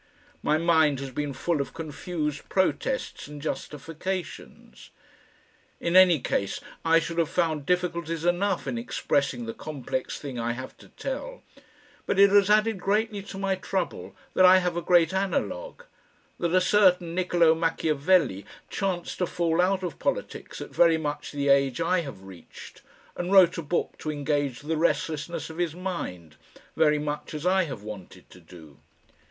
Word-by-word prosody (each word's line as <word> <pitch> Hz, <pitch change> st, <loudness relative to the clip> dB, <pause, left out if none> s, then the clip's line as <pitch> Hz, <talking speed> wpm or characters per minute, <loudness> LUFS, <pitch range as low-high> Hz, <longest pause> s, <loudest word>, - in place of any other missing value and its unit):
My 155 Hz, -, +2 dB
mind 160 Hz, -4 st, +3 dB
has 135 Hz, -1 st, -6 dB
been 145 Hz, +2 st, -3 dB
full 160 Hz, +2 st, -1 dB
of 135 Hz, +2 st, -6 dB
confused 155 Hz, -1 st, -4 dB
protests 195 Hz, -, -1 dB
and 150 Hz, 0 st, -9 dB
justifications. 165 Hz, +4 st, -6 dB, 0.9 s
In 170 Hz, +1 st, -1 dB
any 185 Hz, -4 st, +7 dB
case 100 Hz, -5 st, -2 dB, 0.2 s
I 165 Hz, 0 st, +5 dB
should 165 Hz, +1 st, -1 dB
have 165 Hz, -2 st, +1 dB
found 160 Hz, -5 st, -1 dB
difficulties 170 Hz, -2 st, -1 dB
enough 175 Hz, -2 st, +1 dB
in 125 Hz, -4 st, -2 dB
expressing 125 Hz, +1 st, -1 dB
the 115 Hz, -, -5 dB
complex 135 Hz, -3 st, -4 dB
thing 135 Hz, -4 st, -6 dB
I 115 Hz, +1 st, -1 dB
have 130 Hz, +2 st, -8 dB
to -, -, -15 dB
tell, -, -, -6 dB, 0.6 s
but -, -, 0 dB
it 200 Hz, 0 st, +7 dB
has 200 Hz, -1 st, +5 dB
added 215 Hz, -1 st, +3 dB
greatly 210 Hz, +2 st, 0 dB
to 195 Hz, 0 st, -9 dB
my 195 Hz, 0 st, 0 dB
trouble 190 Hz, 0 st, -3 dB, 0.2 s
that 185 Hz, -, +4 dB
I 185 Hz, 0 st, +8 dB
have 180 Hz, -2 st, 0 dB
a 175 Hz, -, -1 dB
great 170 Hz, -1 st, +4 dB
analogue, 485 Hz, -, -2 dB, 0.6 s
that 170 Hz, 0 st, 0 dB
a 185 Hz, -, +5 dB
certain 180 Hz, -3 st, +3 dB
Niccolo 175 Hz, -2 st, +3 dB
Machiavelli 160 Hz, -, +1 dB, 0.3 s
chanced 185 Hz, -3 st, -2 dB
to 180 Hz, -, +1 dB
fall 170 Hz, 0 st, +1 dB
out 190 Hz, +1 st, +1 dB
of 180 Hz, -, -5 dB
politics -, -, -3 dB
at -, -, -7 dB
very 165 Hz, -2 st, +5 dB
much 150 Hz, -2 st, -4 dB
the 140 Hz, -1 st, -2 dB
age 140 Hz, -1 st, +3 dB
I 180 Hz, +2 st, +2 dB
have 135 Hz, -, -9 dB
reached, 95 Hz, -3 st, -13 dB, 0.3 s
and 175 Hz, +1 st, -3 dB
wrote 190 Hz, -4 st, +6 dB
a -, -, -2 dB
book 165 Hz, +3 st, -2 dB
to 155 Hz, -, -4 dB
engage 145 Hz, -3 st, -1 dB
the 155 Hz, +2 st, -2 dB
restlessness 160 Hz, -1 st, -1 dB
of 160 Hz, -, -10 dB
his 170 Hz, -3 st, -1 dB
mind, 90 Hz, -, -5 dB, 0.4 s
very 150 Hz, -1 st, +4 dB
much 150 Hz, +1 st, -4 dB
as 150 Hz, +2 st, -5 dB
I 185 Hz, 0 st, +3 dB
have 130 Hz, -9 st, -7 dB
wanted 95 Hz, -3 st, -10 dB
to 90 Hz, -, -14 dB
do. 80 Hz, -4 st, -15 dB
165 Hz, 165 wpm, -26 LUFS, 145-185 Hz, 0.9 s, I